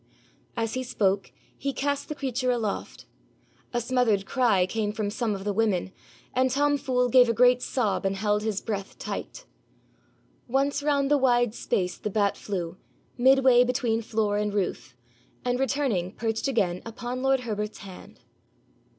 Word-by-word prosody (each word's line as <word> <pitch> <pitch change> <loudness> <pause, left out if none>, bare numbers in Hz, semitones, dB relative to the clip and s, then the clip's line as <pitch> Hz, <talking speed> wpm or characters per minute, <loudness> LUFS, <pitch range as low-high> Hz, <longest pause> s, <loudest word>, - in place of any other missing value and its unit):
As 225 -1 -1
he 255 - -1
spoke 200 -6 0 0.2
he 275 0 -3
cast 285 +1 -2
the 300 - -3
creature 255 -2 -2
aloft. 230 -5 -2 0.7
A 240 - 0
smothered 235 -5 +1
cry 225 -8 +2
came 210 +2 -2
from 210 -1 -3
some 220 -1 -1
of 195 - -7
the 205 0 -1
women, 195 -4 0 0.4
and 255 +1 +2
Tom 290 +2 +2
Fool 250 -2 +1
gave 245 0 +6
a 230 - +1
great 250 +1 +5
sob 235 -7 -1
and 195 0 0
held 210 +1 +1
his 215 -2 -2
breath 200 -3 -5
tight. - - -6 1.0
Once 275 +3 +1
round 285 -1 +1
the 290 - +5
wide 245 -3 +3
space 180 -6 -1
the 210 - -3
bat 200 -1 +1
flew, 180 -4 -4 0.4
midway 260 -1 +5
between 245 -2 0
floor 215 -2 0
and 210 -1 -1
roof, 180 -9 -2 0.5
and 245 0 0
returning 265 -10 0
perched 225 +2 -1
again 195 -9 0
upon 240 +2 -5
lord 270 -1 +2
Herbert's 210 -3 -4
hand. 185 -2 -12
230 Hz, 160 wpm, -26 LUFS, 205-255 Hz, 1.0 s, gave